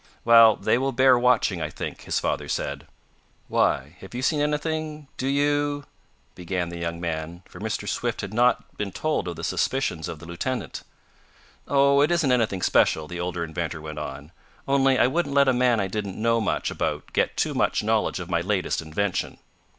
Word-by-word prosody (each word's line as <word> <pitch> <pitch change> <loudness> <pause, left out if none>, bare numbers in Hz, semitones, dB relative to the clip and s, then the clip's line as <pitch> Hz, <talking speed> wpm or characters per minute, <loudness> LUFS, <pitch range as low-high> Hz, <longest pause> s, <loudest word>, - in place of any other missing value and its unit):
"Well, 115 -2 +8
they 120 - +1
will 135 +1 -1
bear 130 0 +5
watching 125 -1 +2
I - - -2
think," - - -7
his - - 0
father - - -2
said. - - -3 0.6
"Why, 70 +7 0
have 95 +5 -11
you 125 - -3
seen 150 +2 +2
anything 150 0 -2
do 130 - -3
you 145 +1 +1 0.3
" - - -39
began 90 -1 -3
the 85 0 -7
young 85 0 -3
man, 85 +1 -4
for - - -13
Mr. - - -3
Swift - - -2
had 100 - -6
not 120 +2 +1
been 100 -2 -3
told 155 -1 -1
of 85 - -4
the - - -8
suspicions 130 - -1
of 80 - -6
the 80 - -12
lieutenant. 85 - -4 0.9
"Oh, 140 0 +4
it 150 - +3
isn't 170 -6 +2
anything 110 -7 +1
special," 80 -1 +3
the 85 +2 -6
older 90 -1 -2
inventor 85 0 -4
went 75 0 -7
on. 70 +3 -7 0.4
"Only 135 -1 +3
I - - +5
wouldn't 140 +1 0
let 140 -1 +5
a 130 - +4
man 125 -2 +3
I 100 - +1
didn't 100 0 -4
know 115 +1 +2
much 105 - -1
about - - -3
get - - 0
too - - 0
much - - +1
knowledge 110 -2 +1
of 90 - -6
my 85 -1 0
latest 95 -1 -1
invention." 90 +5 -2
110 Hz, 195 wpm, -25 LUFS, 85-135 Hz, 0.9 s, Well